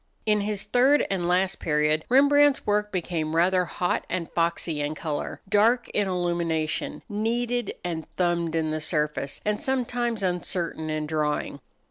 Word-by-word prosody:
In 210 -1 +3
his 205 -1 -1
third 265 +4 +3
and 180 -3 -1
last 185 +1 +1
period 150 0 +1
Rembrandt's 285 +2 +5
work 210 0 +1
became 165 -4 -2
rather 180 +2 +3
hot 175 +1 -1
and 170 -2 -3
foxy 165 -2 0
in 145 +1 -2
color, 150 -2 -4
dark 225 +4 +3
in 205 -1 0
illumination, 170 -3 -1
kneaded 235 +3 -1
and 165 -3 -4
thumbed 170 -2 0
in 160 -1 0
the 155 0 -2
surface, 150 -3 -2
and 210 0 0
sometimes 245 -5 -1
uncertain 175 -3 -2
in 155 0 -2
drawing. 150 -1 -1
180 Hz, 145 wpm, -26 LUFS, 160-210 Hz, -, Rembrandt's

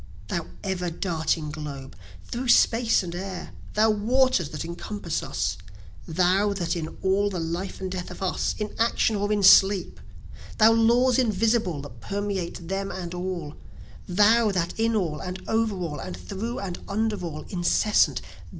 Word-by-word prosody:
Thou - - -2 0.2
ever 185 -3 -2
darting 160 -3 -1
Globe! 145 -3 -7 0.3
through 250 +2 -4
Space 230 -2 +4
and 170 -1 -6
Air! 185 +1 -6 0.2
Thou 220 +1 +4
waters 225 - +2
that 155 0 -5
encompass 170 0 -4
us! 95 -1 -2 0.5
Thou 185 +5 +2
that 180 -3 -2
in 160 -2 -5
all 195 +2 +2
the 185 -3 -4
life 170 +4 -4
and 190 -1 -4
death 180 -1 -4
of - - -9
us, 185 - -1
in 210 -1 -4
action 225 -1 +2
or 205 +1 -1
in 205 -1 +1
sleep! 195 0 +6 0.6
Thou 220 +1 +7
laws 235 +3 +4
invisible 220 - +1
that 120 -5 -11
permeate 195 -4 -3
them 195 +1 -2
and 180 -2 -5
all, 175 -4 -4 0.5
Thou 215 +4 +4
that 175 -3 -1
in 225 0 +2
all, 165 -7 -1
and 180 0 -5
over 220 -2 +1
all, 165 -6 -4
and 90 - -6
through 200 - -5
and 185 -3 -5
under 210 -2 -1
all, 155 -3 -5
incessant! 185 +3 +2
190 Hz, 160 wpm, -25 LUFS, 170-215 Hz, 0.6 s, Thou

